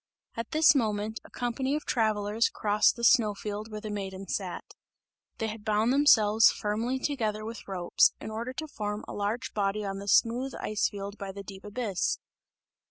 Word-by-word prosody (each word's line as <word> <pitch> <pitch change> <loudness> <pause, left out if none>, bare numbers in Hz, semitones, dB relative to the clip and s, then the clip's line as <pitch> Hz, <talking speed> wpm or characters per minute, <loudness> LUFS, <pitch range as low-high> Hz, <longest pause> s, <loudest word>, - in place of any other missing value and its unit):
At 230 0 -4
this 315 +1 +6
moment, 220 -4 -1
a - - -15
company 260 +3 -2
of 305 - -4
travellers 215 -1 +1
crossed 210 0 +2
the 235 - -8
snow 215 -3 +5
field 210 +1 -5
where 215 -1 -6
the 215 -1 -5
Maiden 195 -1 -5
sat; 185 0 -3 0.7
they 225 - -2
had 215 -1 -5
bound 215 +3 +2
themselves 225 -6 +6
firmly 225 +5 -1
together 220 -6 -2
with 225 +1 -8
ropes, 180 -3 +3
in 220 - -7
order 230 +3 -4
to 315 +4 -5
form 210 -6 -4
a - - -6
large 215 +5 -2
body 205 0 -1
on 195 0 -4
the 200 - -8
smooth 245 +6 +3
ice 210 -1 0
field 200 0 -7
by 195 -2 -5
the 200 +1 -8
deep 195 0 -10
abyss. 210 -3 -1
215 Hz, 180 wpm, -29 LUFS, 205-235 Hz, 0.7 s, this